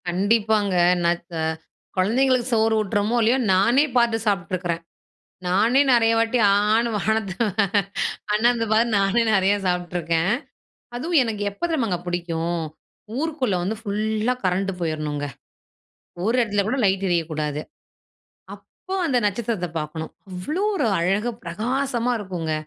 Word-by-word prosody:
கண்டிப்பாங்க. 205 +1 +1 0.3
ந - - +3 0.2
க - - -11 0.6
குழந்தைகளுக்கு 250 +5 +2
சோறு 220 0 +3
ஊட்டறோமோ 210 +2 0
இல்லையோ, 230 +4 +3 0.2
நானே 235 +10 +4
பார்த்து 235 -2 +3
சாப்பிட்டுருக்கறேன். 175 -3 -1 0.6
நானே 215 +9 +3
நிறைய 230 -2 +4
வாட்டி 230 +2 +1
ஆன்னு 215 +3 +2
வானத்த 215 -2 -1 1.0
அண்ணாந்து 230 +2 +2
பார்த்து 225 +1 +3
நானே 195 +4 +2
நிறைய 195 +1 +3
சாப்பிட்டுருக்கேன். 175 -1 0 0.7
அதுவும் 315 +4 +2
எனக்கு 215 -3 -3
எப்ப 200 - -22
தெரியுமாங்க 230 - 0
பிடிக்கும், 170 -1 -2 0.6
ஊருக்குள்ள 285 - -1
வந்து 205 +5 -2
ஃபுல்லா 215 +2 -1
கரண்ட் 190 +2 +1
போயிரணுங்க. 155 -3 -2 1.0
ஒரு 225 +3 +2
இடத்துல 205 -3 0
கூட 255 - 0
லைட் 195 0 +1
எரியக்கூடாது. 155 -3 -1 0.9
அப்போ 380 - -10
அந்த 265 -5 +2
நட்சத்திரத்தை 205 -3 -2
பாக்கணும். 155 +1 -6 0.2
அவ்வளவு 285 - -3
ஒரு 250 - +1
அழகா 195 +7 +1
பிரகாசமா 245 +7 -1
இருக்குங்க. 180 -6 -4
205 Hz, 115 wpm, -23 LUFS, 180-235 Hz, 1.0 s, நானே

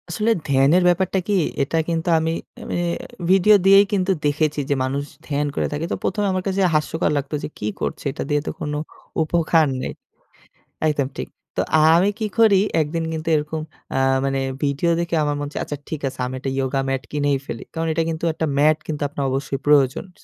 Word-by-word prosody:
আসলে 215 +6 +1 0.2
ধ্যানের 140 +6 +4
ব্যাপারটা 185 +2 +2
কি? 205 - +1 0.3
এটা 150 +4 -1
কিন্তু 165 +1 -1
আমি 160 +1 0 0.3
আমি - - -3 0.5
ভিডিও 195 +3 +6
দিয়েই 195 +1 +8
কিন্তু 190 -1 +2
দেখেছি 150 +1 +1
যে, 140 - +2
মানুষ 135 +2 -1 0.2
ধ্যান 145 0 0
করে - - 0
থাকে। 150 +2 -2
তো - - +1
১ম 210 - -1
এ - - +2
আমার 185 0 -1
কাছে 195 0 0
হাস্যকর 155 +2 +1
লাগতো 140 +2 -3
যে, - - -2
কি 105 - -2
করছে - - -3
এটা - - -5
দিয়ে 145 0 +2
তো - - 0
কোন 150 - -3 0.5
উপকার 160 -1 +2
নেই। - - -4 0.9
একদম 145 -3 +1
ঠিক। - - -4 0.3
তো - - +1 0.2
আ - - +5 0.2
আমি 190 +4 +3
কি 215 - 0
করি? 205 -4 +6 0.2
একদিন 160 +2 -2
কিন্তু 160 0 -5
এরকম 155 +1 -2 0.3
আ - - +2 0.3
মানে 135 0 0 0.2
ভিডিও 145 +4 +1
দেখে 170 0 -1
আমার 145 0 0
মন 145 - -3
ছে - - -6
আচ্ছা 145 - -5
ঠিক 155 -2 -4
আছে, 130 - -7
আমি 130 +1 -4
একটা 135 +1 -3
yoga 135 +1 0
mat 135 0 -1
কিনেই 145 -1 +1
ফেলি। 115 - -6
কারণ 165 0 -2
এটা 165 +1 +1
কিন্তু 160 0 -4
একটা 160 - -2
ম্যাট 150 +2 +4
কিন্তু 150 -2 -4
আপনার 140 0 -4
অবশ্যই 135 0 -2
প্রয়োজন। 140 -1 +3 0.2
স - - -22
155 Hz, 205 wpm, -22 LUFS, 140-170 Hz, 0.9 s, দিয়েই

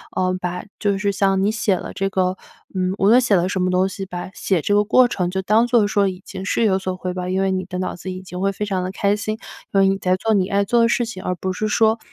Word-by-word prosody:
呃， 185 0 +1
把 180 0 -4 0.2
就 200 -2 +1
是 200 0 +1
像 195 0 +1
你 210 - +2
写 220 -3 +1
了 - - -6
这 195 0 -1
个 185 -1 0 0.4
嗯， 185 0 0
无 195 - +3
论 240 +3 +7
写 235 -5 +3
了 180 +1 +1
什 190 - -2
么 185 - +1
东 185 +1 +2
西 195 0 -6
吧， 180 0 -6
写 185 -6 0
这 205 - 0
个 205 - +4
过 255 +4 +5
程 180 -6 -1
就 190 0 -1
当 215 +4 +3
做 235 -4 +4
说 205 -2 +2
已 185 -1 -5
经 190 -1 -7
是 230 - +1
有 195 -4 +3
所 185 -1 -3
回 185 0 -4
报。 180 0 -4
因 185 +1 0
为 195 - +1
你 185 -1 -2
的 180 0 -5
脑 185 - -3
子 185 - -8
已 185 - -6
经 180 -1 -8
会 195 +1 +1
非 210 - -3
常 190 -3 -1
地 185 - -3
开 200 +1 +1
心， 215 0 -3 0.4
因 195 - +4
为 195 - +5
你 195 - +1
在 185 -1 +1
做 220 +4 0
你 190 -3 +2
爱 200 0 +1
做 235 +4 +2
的 230 - +5
事 240 0 +1
情， 205 -5 -7
而 180 - -1
不 185 +2 -3
是 215 +4 -2
说 220 +1 +2
190 Hz, 320 characters per minute, -21 LUFS, 185-205 Hz, 0.4 s, 论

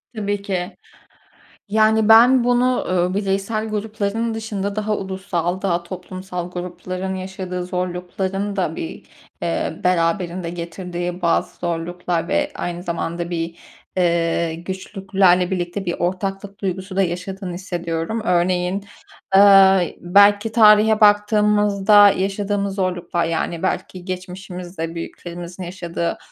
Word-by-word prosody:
Tabii 205 -1 -2
ki. 190 -1 -4 0.9
Yani, 220 +1 +3
ben 240 +3 +7
bunu 245 +1 +2
eee, 180 0 +1
bireysel 200 +2 -1
grupların 215 +1 -2
dışında 205 -2 -4
daha 215 0 0
ulusal 190 -2 -3
daha 175 -3 0
toplumsal 180 0 -6
grupların 180 +1 -5
yaşadığı 185 -1 -5
zorlukların 185 +2 -3
da 175 -4 -1
bir, 160 - -6 0.4
eee, 165 -1 -2
beraberinde 175 0 0
getirdiği 175 +1 -5
bazı 170 -1 +1
zorluklar 175 0 -2
ve - - +1
aynı 175 0 -4
zamanda 170 0 -3
bir, 165 0 -3 0.4
eee, 170 -2 +1
güçlüklerle 190 +1 +1
birlikte 180 +1 -3
bir 175 -2 -1
ortaklık 195 +2 -3
duygusu 190 0 -4
da 195 - +4
yaşadığını 185 +1 -4
hissediyorum. 175 +2 -3
Örneğin, 180 +1 +1 0.5
ııı, 195 -1 +7 0.2
belki 205 +4 +4
tarihe 215 -1 +6
baktığımızda 210 -1 +5
yaşadığımız 200 0 -1
zorluklar, 180 -3 -1
yani, 165 +1 -2
belki 185 -1 -3
geçmişimizde 180 -2 -6
büyüklerimizin 175 +2 -7
yaşadığı 170 -1 -4
185 Hz, 110 wpm, -21 LUFS, 175-200 Hz, 0.9 s, ben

